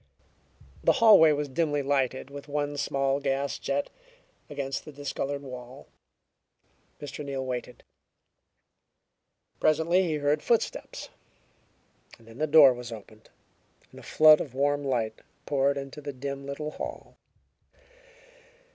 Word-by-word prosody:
The - - +5
hallway 215 - +7
was 145 0 -1
dimly 145 +1 -1
lighted 135 -1 -1
with 140 +1 -9
one 145 0 -2
small 135 -1 0
gas 140 0 -2
jet 140 +1 -2
over - - -19
against 135 -1 -4
the 155 - -10
discolored 145 0 -4
wall. 125 0 -10 1.1
Mr. 150 0 -7
Neal 135 -2 -4
waited. 125 -1 -6 1.8
Presently 160 +4 +3
he 155 - -1
heard 150 0 0
footsteps. 235 -2 -2 1.1
Then 115 +2 -15
the 155 - +1
door 145 -3 +8
was 120 -1 -8
opened 110 0 -12 0.6
and - - -13
a - - -12
flood 155 -1 +6
of 130 -4 -7
warm 145 +1 +1
light 115 -5 -2 0.2
poured 140 0 +1
into 140 +2 -7
the 145 -1 -6
dim 140 +1 -6
little 150 +2 -5
hall. - - -8
140 Hz, 125 wpm, -27 LUFS, 135-150 Hz, 1.8 s, door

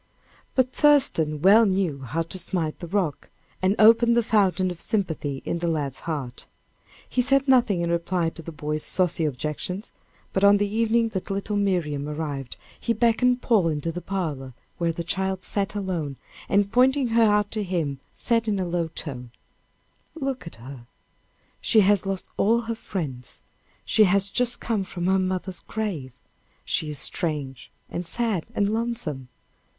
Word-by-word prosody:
But 260 -1 +2
Thurston 215 - +3
well 215 +4 +7
knew 185 -7 0
how 160 +6 -2
to 175 +3 -6
smite 170 -3 -2
the 175 - -7
rock, 175 -5 -2 0.3
and 190 +2 +2
open 230 +2 +6
the 235 - +3
fountain 195 -4 +2
of 170 - -8
sympathy 160 - -2
in 170 - -2
the 170 - -1
lad's 145 -5 -2
heart. 145 -7 -5 0.6
He 250 - +1
said 275 +2 +2
nothing 235 -9 +4
in 170 - 0
reply 170 0 0
to 165 - -10
the 165 - -8
boy's 150 0 -3
saucy 175 -2 0
objections, 150 - -4 0.4
but 190 - 0
on 200 0 +7
the 205 0 +1
evening 225 +2 +1
that 190 -3 -5
little 200 +2 -2
Miriam 165 -8 0
arrived, 145 -4 -4 0.2
he 235 - 0
beckoned 245 +2 +2
Paul 210 -8 +3
into 160 +1 -1
the 180 +2 -6
parlor, 150 -11 -4 0.2
where 170 -1 +1
the 170 +1 -4
child 190 +1 -2
sat, 200 +1 -1
alone, 170 -9 -3 0.3
and 200 0 +2
pointing 260 +2 +3
her 230 +1 +3
out 210 -2 +3
to 215 - -2
him, 165 -8 -2 0.2
said 230 -1 0
in 210 -2 +1
a 185 - -1
low 170 -1 -1
tone: 135 -6 -7 0.9
"Look 270 - -4
at - - -9
her; 120 +1 -11 0.7
she 220 - +4
has 200 -1 +3
lost 195 -1 -3
all 230 +3 +3
her 230 0 -3
friends 145 - -6 0.4
she 215 - +5
has 200 +1 +2
just 245 +2 +1
come 220 -4 -1
from 175 -2 -5
her 190 +1 +3
mother's 185 -1 -2
grave 180 - -4 0.5
she 155 - -1
is 150 - -3
strange, 145 -8 -2 0.2
and 175 0 -5
sad, 215 -3 -1
and 200 - +2
lonesome. 220 - -2
185 Hz, 165 wpm, -25 LUFS, 155-220 Hz, 0.9 s, well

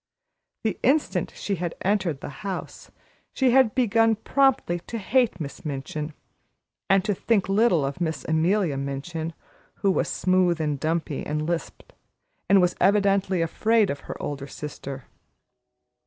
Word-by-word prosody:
The 220 - -1
instant 285 +4 +1
she 200 -2 -3
had 170 0 -3
entered 190 -7 0
the - - -6
house, 195 -3 -6 0.4
she 260 -2 +3
had 260 -3 +4
begun 225 -2 +3
promptly 245 -6 +2
to 230 - -4
hate 230 -2 +1
Miss 145 -3 -7
Minchin, 150 +1 -5 0.7
and 195 -1 +4
to 210 - +1
think 200 0 +1
little 195 -6 +3
of 140 +6 -5
Miss 160 -2 -2
Amelia 165 0 +1
Minchin, 155 +4 -4 0.4
who 195 -1 +1
was - - 0
smooth 185 -2 +2
and 150 -3 -1
dumpy, 160 -1 -1
and 150 +1 -2
lisped, 170 0 -4 0.6
and 195 0 +7
was 180 -1 +2
evidently 195 -3 +3
afraid 215 +4 +2
of 140 - -5
her - - -5
older 140 -1 -4
sister. 140 -3 -7
180 Hz, 140 wpm, -25 LUFS, 155-210 Hz, 0.7 s, and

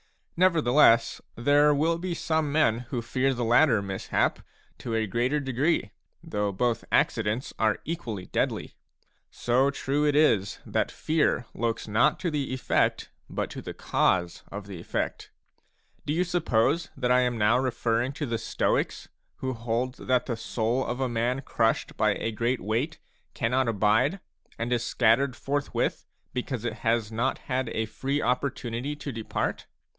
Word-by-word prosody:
Nevertheless, 150 -9 +4
there 145 +5 +4
will 165 +3 +1
be 175 -1 -3
some 160 -3 0
men 140 -7 +3
who 120 -4 -2
fear 130 +3 +1
the 120 -2 -2
latter 120 -2 +4
mishap 95 -1 -1 0.4
to 115 -2 -3
a 110 -1 +1
greater 120 +8 0
degree, 135 -3 0 0.3
though 105 -1 -1
both 115 +3 0
accidents 115 +3 +1
are 110 -1 +2
equally 120 - -4
deadly; - - -2 0.6
so 130 +3 +2
true 140 +1 -1
it 145 -1 +2
is 110 -10 +3
that - - 0
fear 155 -5 0
looks 115 -1 -2
not 110 +3 +3
to 175 -3 -1
the 145 -3 -2
effect, 130 0 0 0.2
but - - -3
to - - -6
the - - -7
cause 85 -2 +1
of 100 0 -6
the 100 -4 -8
effect. - - -3 0.8
Do 145 - +1
you 175 +3 +2
suppose 165 -3 +1
that 125 -2 0
I 125 - +5
am 125 -1 +1
now 110 +3 +3
referring 120 -1 0
to 150 +1 -3
the 115 -3 -2
Stoics, - - -1
a - - -25 0.3
who 130 0 -1
hold 120 +2 -2
that 125 -1 +1
the 120 - -2
soul 115 +3 -1
of 125 +1 -3
a 130 - +1
man 120 +3 -1
crushed 115 -3 0
by - - +2
a 115 - -2
great 120 +3 0
weight 115 - -1 0.4
cannot 125 +1 +1
abide, 115 - +2 0.4
and 120 +2 -1
is 120 -1 0
scattered 125 +3 +2
forthwith, 140 +3 -2 0.3
because 125 -2 -3
it 115 -1 -3
has 115 -1 0
not 120 +4 0
had 130 0 -2
a 110 - -1
free 135 +6 -2
opportunity 125 0 -2
to 145 -1 -6
depart 115 -2 -3
125 Hz, 160 wpm, -27 LUFS, 115-140 Hz, 0.8 s, I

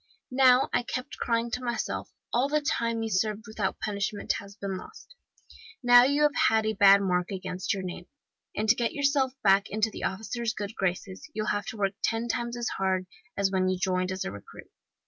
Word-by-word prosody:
'Now,' 255 0 +5
I - - +3
kept 250 +1 -5
crying 230 0 0
to 250 +1 -3
myself, 240 -2 -3 0.2
'all 255 +4 +2
the 300 +1 +2
time 230 -6 -1
you 225 - -2
served 215 +2 0
without 215 -3 -2
being 205 -2 -3
punished 210 +2 0 0.2
has 200 0 -12
been 200 -2 -4
lost. 440 - -11 0.7
Now 245 0 +8
you 285 +2 +2 0.2
have 220 0 +2
a 220 - +1
bad 200 0 +6
mark 180 -2 0
against 185 -1 -4
your 195 -1 -2
name, 180 -1 -7 0.5
and 215 - -1
to 215 - +7
get 235 -1 -1
yourself 280 -2 +1
back 195 0 +4
into 215 +1 0
the - - -5
officers' 220 +3 -3
good 205 +1 -5
graces 190 - -3
you'll 215 0 -1
have 205 0 -3
to 225 - -6
work 195 -1 0
ten 225 +1 0
times 235 0 -2
as 240 -1 -2
hard 190 -1 0 0.3
as 200 -1 +1
when 185 -1 +1
you 185 - 0
joined 185 0 0
as 190 0 -3
a - - -3
recruit. 100 0 -12
215 Hz, 205 wpm, -28 LUFS, 190-240 Hz, 0.7 s, Now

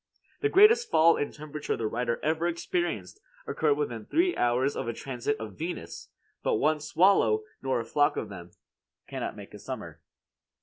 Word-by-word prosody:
The 425 - +1
greatest 450 +5 +6
fall 165 +1 +5
in 145 - -2
temperature 150 0 -5
the 115 - -3
writer 115 +2 -1
ever 160 +2 +1
experienced 345 - -3 0.2
occurred 155 - +1
within 120 -7 -3
three 350 +2 +2
hours 125 +3 +1
of - - -3
a 115 - -1
transit 135 +2 -3
of 110 -3 -6
Venus; 170 +3 -6 0.3
but - - +1
one 150 +7 +2
swallow 150 - +3 0.2
nor 130 -2 0
a 115 - -4
flock 145 +5 +2
of - - -3
them 90 -3 -10 0.6
cannot - - -4
make - - -11
a - - -9
summer. - - -7
150 Hz, 170 wpm, -28 LUFS, 120-170 Hz, 0.6 s, greatest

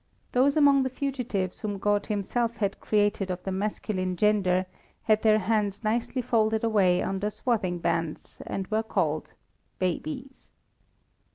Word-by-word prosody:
Those 275 +4 +3
among 280 -2 +6
the 260 - 0
fugitives 250 -9 -3
whom 205 -2 -3
God 205 +1 +1
Himself 230 +3 -1
had 200 -2 -1
created 205 -2 +1
of 180 0 -4
the 190 - -3
masculine 190 -1 -2
gender 190 -2 +2 0.4
had 215 -1 +3
their 215 -1 +5
hands 210 0 0
nicely 235 +4 -1
folded 220 -1 +1
away 195 -6 +3
under 195 +2 -1
swathing 210 -4 -1
bands, 165 -2 -3
and 195 - -3
were 220 0 +1
called 165 -8 -1 0.4
babies. 260 - -4
210 Hz, 140 wpm, -27 LUFS, 190-230 Hz, 0.4 s, among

